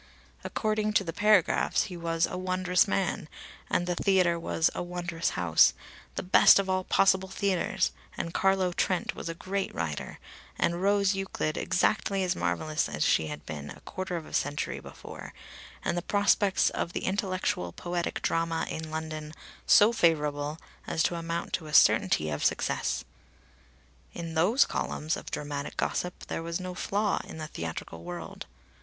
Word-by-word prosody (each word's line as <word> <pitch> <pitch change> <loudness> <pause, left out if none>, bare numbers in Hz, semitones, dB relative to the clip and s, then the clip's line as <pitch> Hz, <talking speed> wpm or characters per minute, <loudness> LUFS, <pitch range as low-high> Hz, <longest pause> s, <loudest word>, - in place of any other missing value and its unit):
According 215 0 -1
to 205 - +3
the 165 -3 -5
paragraphs, 210 -2 +3
he 180 - -7
was 165 -1 0
a - - -6
wondrous 185 0 +2
man, 95 - -1 0.4
and 175 - +1
the 175 - 0
theatre 180 -2 +2
was 165 -1 +1
a - - -3
wondrous 175 -1 -2
house, 80 -3 +5 0.4
the - - -3
best 185 - +7
of 195 -1 +1
all 185 0 0
possible 190 0 +3
theatres, 195 -1 0 0.3
and 170 - -4
Carlo 190 -2 +2
Trent 185 0 0
was - - -6
a 165 - -4
great 195 +3 -3
writer, 80 -3 -4 0.4
and 170 +1 0
Rose 200 0 +3
Euclid 195 -5 -2
exactly 195 +1 +1
as 180 0 0
marvellous 155 -1 -1
as - - -1
she 80 - +3
had 75 -1 -7
been 75 -1 -6
a - - -10
quarter 185 -1 -4
of 160 - -7
a - - -13
century 145 0 -1
before, - - -10 0.5
and - - +1
the 175 - -1
prospects 200 0 +2
of 170 - -3
the - - -3
intellectual 185 - -1
poetic 175 - -3
drama 165 0 0
in 160 0 -5
London 155 -1 -5 0.3
so 215 +3 +7
favourable 150 -6 +1 0.3
as 160 - +1
to - - +1
amount 170 0 -4
to 160 - -2
a 150 - -9
certainty 75 0 +5
of 75 - -3
success. - - 0 1.1
In 165 -1 -5
those 190 +11 +4
columns 155 +3 -2
of - - -8
dramatic 145 -1 -4
gossip 180 0 -2
there - - -4
was 170 +1 -3
no 185 0 -5
flaw 205 +3 0
in - - -10
the 155 - -5
theatrical 85 - -6
world. 90 +1 -7
175 Hz, 165 wpm, -28 LUFS, 155-190 Hz, 1.1 s, best